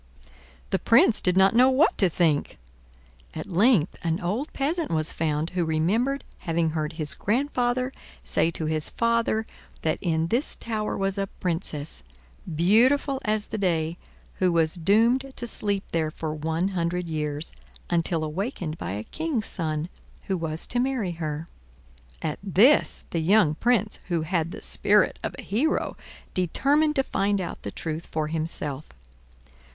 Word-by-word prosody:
The 190 Hz, -, +2 dB
Prince 230 Hz, -1 st, +4 dB
did 180 Hz, 0 st, +1 dB
not 190 Hz, +2 st, +6 dB
know 250 Hz, +3 st, +6 dB
what 265 Hz, +4 st, +4 dB
to 190 Hz, -, +5 dB
think. 160 Hz, -3 st, +1 dB, 0.8 s
At -, -, -4 dB
length 185 Hz, -, +3 dB
an 165 Hz, 0 st, 0 dB
old 210 Hz, -, -2 dB
peasant 315 Hz, +4 st, -1 dB
was 155 Hz, 0 st, 0 dB
found 155 Hz, 0 st, -1 dB
who 180 Hz, -1 st, 0 dB
remembered 205 Hz, -, +1 dB, 0.2 s
having 165 Hz, -1 st, 0 dB
heard 155 Hz, 0 st, -2 dB
his 155 Hz, -2 st, -3 dB
grandfather 250 Hz, +2 st, 0 dB, 0.3 s
say 165 Hz, -, +2 dB
to 160 Hz, -1 st, -4 dB
his 155 Hz, -1 st, -1 dB
father 230 Hz, -1 st, +1 dB, 0.4 s
that 155 Hz, -, 0 dB
in 165 Hz, -2 st, 0 dB
this 250 Hz, -, 0 dB
tower 215 Hz, -2 st, -3 dB
was 195 Hz, 0 st, 0 dB
a 195 Hz, -, 0 dB
Princess, 165 Hz, -4 st, -2 dB, 0.5 s
beautiful 255 Hz, -, +3 dB
as 215 Hz, 0 st, 0 dB
the 215 Hz, -, -5 dB
day, 170 Hz, -3 st, 0 dB, 0.4 s
who 185 Hz, -1 st, +3 dB
was 165 Hz, -2 st, +2 dB
doomed 230 Hz, +9 st, +2 dB
to 240 Hz, -, -4 dB
sleep 205 Hz, -4 st, -2 dB
there 160 Hz, -2 st, 0 dB
for 155 Hz, 0 st, -4 dB
one 160 Hz, +4 st, -1 dB
hundred 175 Hz, -1 st, -1 dB
years, 150 Hz, -1 st, -3 dB, 0.4 s
until 170 Hz, -1 st, 0 dB
awakened 165 Hz, -, -3 dB
by 85 Hz, -, -4 dB
a 105 Hz, +1 st, -4 dB
king's 305 Hz, -, -2 dB
son, 155 Hz, -3 st, -2 dB, 0.4 s
who 190 Hz, -, -1 dB
was 160 Hz, -2 st, -3 dB
to 245 Hz, -, -1 dB
marry 250 Hz, -7 st, 0 dB
her. 160 Hz, -1 st, -4 dB, 0.8 s
At 155 Hz, -, -2 dB
this 205 Hz, -, +4 dB
the 165 Hz, -, 0 dB
young 180 Hz, -2 st, +4 dB
Prince, 220 Hz, +4 st, +1 dB
who 170 Hz, -3 st, 0 dB
had 165 Hz, -1 st, 0 dB
the -, -, -8 dB
spirit -, -, +3 dB
of -, -, -4 dB
a -, -, -8 dB
hero, 260 Hz, +11 st, 0 dB, 0.4 s
determined 285 Hz, -, +2 dB
to 270 Hz, -, +3 dB
find 200 Hz, -3 st, 0 dB
out 180 Hz, -, -5 dB
the -, -, -5 dB
truth 160 Hz, +1 st, -5 dB
for 155 Hz, -1 st, -2 dB
himself. 155 Hz, -3 st, -3 dB
180 Hz, 155 wpm, -26 LUFS, 160-230 Hz, 0.8 s, not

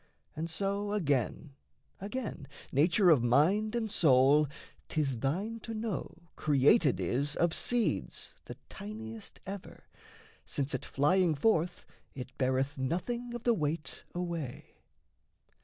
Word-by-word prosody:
And 160 Hz, +2 st, -3 dB
so, 200 Hz, +4 st, -1 dB
Again, 145 Hz, -, 0 dB, 0.5 s
again, 205 Hz, -, -5 dB, 0.2 s
nature 170 Hz, +6 st, +4 dB
of 145 Hz, -7 st, +5 dB
mind 175 Hz, -, +3 dB
and 225 Hz, -3 st, -1 dB
soul 145 Hz, -1 st, +5 dB, 0.4 s
'Tis 135 Hz, -6 st, 0 dB
thine 195 Hz, -, -1 dB
to 225 Hz, +1 st, -6 dB
know 200 Hz, -6 st, -4 dB
created 145 Hz, -, +4 dB
is 140 Hz, +4 st, 0 dB
of 170 Hz, -1 st, +2 dB
seeds 225 Hz, -, 0 dB
The -, -, -8 dB
tiniest 110 Hz, +1 st, -8 dB
ever, 195 Hz, 0 st, -8 dB, 0.6 s
since 140 Hz, 0 st, -2 dB
at -, -, -3 dB
flying 165 Hz, +4 st, +2 dB
forth 170 Hz, +1 st, +1 dB, 0.3 s
It 130 Hz, 0 st, -7 dB
beareth 130 Hz, +2 st, 0 dB
nothing 235 Hz, -, -2 dB
of 240 Hz, -, -6 dB
the 240 Hz, -, +4 dB
weight 155 Hz, -4 st, -3 dB
away. 170 Hz, -7 st, -5 dB
160 Hz, 120 wpm, -31 LUFS, 135-200 Hz, 0.6 s, of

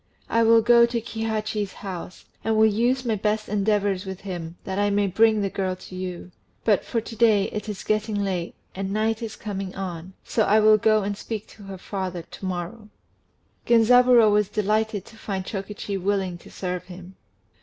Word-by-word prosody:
I 230 Hz, -, +2 dB
will 225 Hz, 0 st, +5 dB
go 235 Hz, 0 st, +6 dB
to 235 Hz, 0 st, -1 dB
Kihachi's 220 Hz, -3 st, -3 dB
house, 185 Hz, -2 st, -8 dB, 0.2 s
and 220 Hz, -1 st, +1 dB
will 220 Hz, -, +6 dB
use 240 Hz, +4 st, +1 dB
my 230 Hz, -, +1 dB
best 215 Hz, +1 st, -1 dB
endeavours 205 Hz, -2 st, +1 dB
with 190 Hz, -2 st, -7 dB
him 175 Hz, -3 st, -6 dB
that 190 Hz, +1 st, -3 dB
I 205 Hz, 0 st, +2 dB
may 205 Hz, 0 st, +2 dB
bring 215 Hz, +3 st, +3 dB
the 195 Hz, -, 0 dB
girl 190 Hz, -1 st, -2 dB
to 185 Hz, -, -12 dB
you. 185 Hz, -1 st, -6 dB, 0.3 s
But 210 Hz, -4 st, +3 dB
for 230 Hz, -, -2 dB
to 225 Hz, +1 st, -9 dB
day, 215 Hz, -4 st, +3 dB
it 210 Hz, 0 st, -5 dB
is 205 Hz, -2 st, -5 dB
getting 215 Hz, 0 st, 0 dB
late, 190 Hz, -4 st, -2 dB, 0.2 s
and 195 Hz, 0 st, -4 dB
night 220 Hz, +2 st, 0 dB
is 225 Hz, -2 st, -5 dB
coming 195 Hz, -3 st, -5 dB
on; 185 Hz, -1 st, -6 dB
so 225 Hz, -, -1 dB
I 215 Hz, 0 st, +4 dB
will 215 Hz, 0 st, +6 dB
go 215 Hz, 0 st, +3 dB
and 205 Hz, +1 st, -2 dB
speak 215 Hz, +1 st, -5 dB
to 205 Hz, -, -14 dB
her 195 Hz, -1 st, -7 dB
father 185 Hz, -2 st, -4 dB
to 190 Hz, -, -10 dB
morrow." 185 Hz, +4 st, -5 dB, 0.8 s
Genzaburô 240 Hz, -1 st, +6 dB
was 210 Hz, -1 st, +2 dB
delighted 215 Hz, -1 st, 0 dB
to 225 Hz, -, -15 dB
find 195 Hz, -3 st, -4 dB
Chokichi 200 Hz, 0 st, -4 dB
willing 190 Hz, -2 st, -1 dB
to -, -, -15 dB
serve 180 Hz, -1 st, -4 dB
him. 180 Hz, 0 st, -11 dB
205 Hz, 190 wpm, -24 LUFS, 190-220 Hz, 0.8 s, go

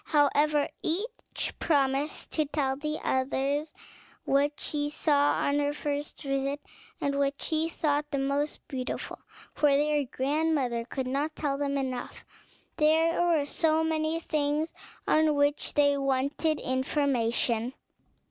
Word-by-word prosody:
However, 295 Hz, 0 st, +3 dB
each 415 Hz, +9 st, -3 dB
promised 280 Hz, -1 st, 0 dB
to 310 Hz, -, +1 dB
tell 280 Hz, -2 st, -1 dB
the 300 Hz, +2 st, -3 dB
others 275 Hz, +3 st, 0 dB, 0.5 s
what 285 Hz, +2 st, +2 dB
she 290 Hz, -1 st, -1 dB
saw 290 Hz, -1 st, +3 dB
on 285 Hz, +1 st, +1 dB
her 290 Hz, 0 st, 0 dB
first 290 Hz, 0 st, -4 dB
visit, 275 Hz, +1 st, -1 dB, 0.4 s
and 280 Hz, 0 st, -1 dB
what 280 Hz, 0 st, 0 dB
she 320 Hz, 0 st, 0 dB
thought 295 Hz, -2 st, 0 dB
the 285 Hz, -, -2 dB
most 280 Hz, +2 st, -1 dB
beautiful; 255 Hz, -3 st, -4 dB, 0.3 s
for 295 Hz, -, +3 dB
their 295 Hz, +1 st, +2 dB
grandmother 265 Hz, -3 st, 0 dB
could 260 Hz, +2 st, -4 dB
not 285 Hz, +4 st, -1 dB
tell 285 Hz, -3 st, -1 dB
them 280 Hz, -1 st, 0 dB
enough; 260 Hz, -2 st, -4 dB, 0.5 s
there 320 Hz, +2 st, +3 dB
were 335 Hz, -4 st, +3 dB
so 320 Hz, +2 st, +1 dB
many 320 Hz, 0 st, 0 dB
things 305 Hz, 0 st, -1 dB, 0.3 s
on 310 Hz, -1 st, +4 dB
which 285 Hz, +1 st, +1 dB
they 285 Hz, -1 st, +4 dB
wanted 275 Hz, +3 st, 0 dB
information. 255 Hz, -3 st, 0 dB
290 Hz, 130 wpm, -28 LUFS, 275-310 Hz, 0.5 s, on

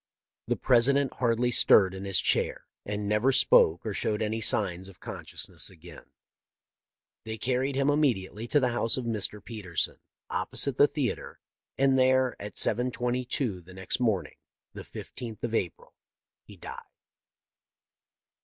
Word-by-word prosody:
The -, -, +1 dB
President 135 Hz, +2 st, +3 dB
hardly 120 Hz, 0 st, +1 dB
stirred 95 Hz, -5 st, +5 dB
in 95 Hz, +1 st, -7 dB
his 95 Hz, -1 st, +2 dB
chair, -, -, +1 dB, 0.2 s
and 105 Hz, 0 st, -3 dB
never 105 Hz, +6 st, +2 dB
spoke 85 Hz, -8 st, +4 dB
or 110 Hz, -, -2 dB
showed 105 Hz, +2 st, -1 dB
any 110 Hz, +1 st, -2 dB
signs 95 Hz, -4 st, 0 dB
of 95 Hz, -, -15 dB
consciousness -, -, -2 dB
again. 85 Hz, -2 st, -14 dB, 0.6 s
" -, -, -65 dB
They 110 Hz, 0 st, -5 dB
carried 130 Hz, +4 st, -1 dB
him 140 Hz, 0 st, +1 dB
immediately 120 Hz, -7 st, 0 dB
to 145 Hz, -, +3 dB
the 130 Hz, -3 st, +1 dB
house 115 Hz, 0 st, +1 dB
of 130 Hz, -, -3 dB
Mr. 105 Hz, -2 st, -2 dB
Petersen, 100 Hz, -8 st, -3 dB, 0.3 s
opposite 140 Hz, -2 st, -2 dB
the 145 Hz, -, +7 dB
theatre, 140 Hz, -6 st, -4 dB, 0.4 s
and 135 Hz, -1 st, +3 dB
there, 130 Hz, -1 st, +3 dB
at 105 Hz, +1 st, -7 dB
7:22 125 Hz, -3 st, 0 dB
the 90 Hz, +2 st, -14 dB
next 95 Hz, +4 st, -2 dB
morning, 110 Hz, -6 st, -1 dB, 0.4 s
the -, -, -7 dB
15th 115 Hz, -4 st, -9 dB
of 120 Hz, -1 st, -3 dB
April, 90 Hz, -7 st, -3 dB, 0.5 s
he -, -, -15 dB
died. -, -, -8 dB
115 Hz, 145 wpm, -28 LUFS, 100-130 Hz, 0.6 s, the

